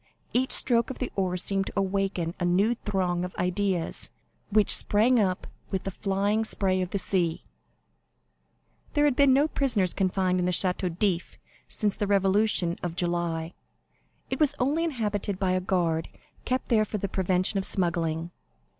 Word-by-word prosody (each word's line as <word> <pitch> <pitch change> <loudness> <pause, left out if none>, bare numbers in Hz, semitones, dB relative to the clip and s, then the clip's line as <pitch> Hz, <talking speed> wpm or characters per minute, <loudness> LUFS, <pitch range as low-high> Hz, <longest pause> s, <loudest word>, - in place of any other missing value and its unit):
Each 260 +1 +1
stroke 235 -2 +6
of 265 - -6
the 255 - -4
oar 185 -2 -1
seemed 195 +1 0
to - - -7
awaken 195 -3 -1
a - - -2
new 190 +6 +2
throng 185 -6 -2
of 180 - -6
ideas, 180 -1 -2 0.4
which 210 0 +7
sprang 230 +4 +3
up 185 -3 0 0.2
with 190 -1 -3
the 195 - -4
flying 200 +3 -1
spray 190 -3 0
of 180 - -3
the 200 - -2
sea. 175 -4 -1 1.4
50219m - - -31
There 295 0 +3
had 285 -4 +2
been 280 0 +4
no 285 +3 +3
prisoners 235 - 0
confined 185 -1 0
in 180 - 0
the 180 - +1
Château 180 -1 -1
d'If 180 -4 -1 0.3
since 210 -3 -1
the 205 - -2
revolution 195 -2 +1
of 170 -2 -4
July; 170 -2 -2 0.8
it - - -2
was 295 -2 +3
only 290 +6 0
inhabited 210 - -2
by 190 -1 0
a 185 0 0
guard, 170 -3 -1 0.4
kept 255 +1 -2
there 220 -3 +3
for 215 0 -4
the 200 - -3
prevention 185 +1 0
of - - -3
smuggling. 170 -2 -1
195 Hz, 170 wpm, -26 LUFS, 180-215 Hz, 1.4 s, which